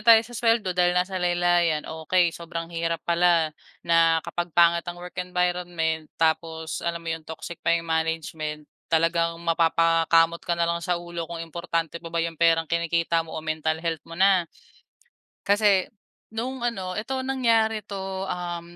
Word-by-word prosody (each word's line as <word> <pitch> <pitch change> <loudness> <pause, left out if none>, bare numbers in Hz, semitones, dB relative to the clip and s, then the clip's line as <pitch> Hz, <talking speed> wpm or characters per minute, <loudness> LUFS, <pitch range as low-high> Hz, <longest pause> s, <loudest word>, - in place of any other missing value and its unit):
tayo 230 +1 +8
sa 240 - -13
suweldo 230 -5 +1
dahil 180 0 +2
nasa 185 +1 0
laylayan. 175 -3 +2
Okey, 165 +2 +1
sobrang 170 0 -6
hirap 165 0 -2
pala 170 -2 +3 0.3
na 165 -1 +4
kapag 175 0 -3
pangit 170 0 +5
ang 175 - -5
work 180 0 -9
environment, 175 -3 -1
tapos 160 0 -1
alam 170 0 -3
mo 165 - -1
'yong 160 -1 -7
toxic 160 +1 -8
pa 170 - -3
'yong 165 - -4
management, 160 -2 -2 0.2
talagang 165 +1 +2
mapapakamot 165 0 +3
ka 170 -1 -2
na 170 - +2
lang 170 0 -1
sa 175 0 0
ulo 170 -1 -6
kung 165 -1 -5
importante 165 0 -3
pa 170 - -8
ba 165 - -6
'yong 165 -1 -6
perang 165 -1 +4
kinikita 170 0 0
mo 165 -1 -7
o 160 - -6
mental 155 0 -1
health 165 -1 -3
mo 165 - -8
na. 185 -2 +4 1.0
Kasi 200 -2 +4 0.5
noong 255 +3 -3 0.2
ano 185 -1 -4
eto 260 +4 -3
nangyari 225 -5 +1
'to, 190 -1 -4
um, 175 -1 -5
170 Hz, 165 wpm, -25 LUFS, 165-180 Hz, 1.0 s, tayo